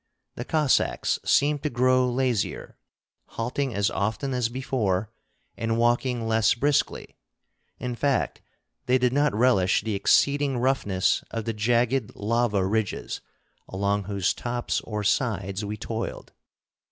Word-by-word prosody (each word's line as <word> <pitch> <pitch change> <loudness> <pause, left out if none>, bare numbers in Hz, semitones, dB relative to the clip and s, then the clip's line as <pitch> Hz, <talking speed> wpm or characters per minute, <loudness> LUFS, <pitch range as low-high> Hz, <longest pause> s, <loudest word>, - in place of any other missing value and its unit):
The 120 - -6
Cossacks 150 -4 +1
seemed 145 0 +2
to 150 - -1
grow 130 +1 +3
lazier, 125 -5 -1 0.6
halting 125 +1 -2
as 100 0 +1
often 110 +7 -2
as 125 -2 0
before 115 -6 -1 0.4
and 115 0 -1
walking 120 0 +1
less 110 0 +3
briskly; 145 +4 0 0.6
in 125 -1 -4
fact, 135 +2 0 0.5
they 125 +1 +4
did 125 -1 +1
not 145 -3 +2
relish 105 -6 +3
the 110 - -2
exceeding 140 +7 +2
roughness 120 -7 +1
of 115 -1 -4
the 115 - -1
jagged 120 +2 +1
lava 105 -2 +1
ridges 105 0 -2 0.5
along 100 +1 -1
whose 100 -2 0
tops 120 0 -2
or 105 -2 -3
sides 100 -3 0
we 105 +1 -4
toiled. 115 +2 -5
115 Hz, 130 wpm, -25 LUFS, 105-130 Hz, 0.6 s, they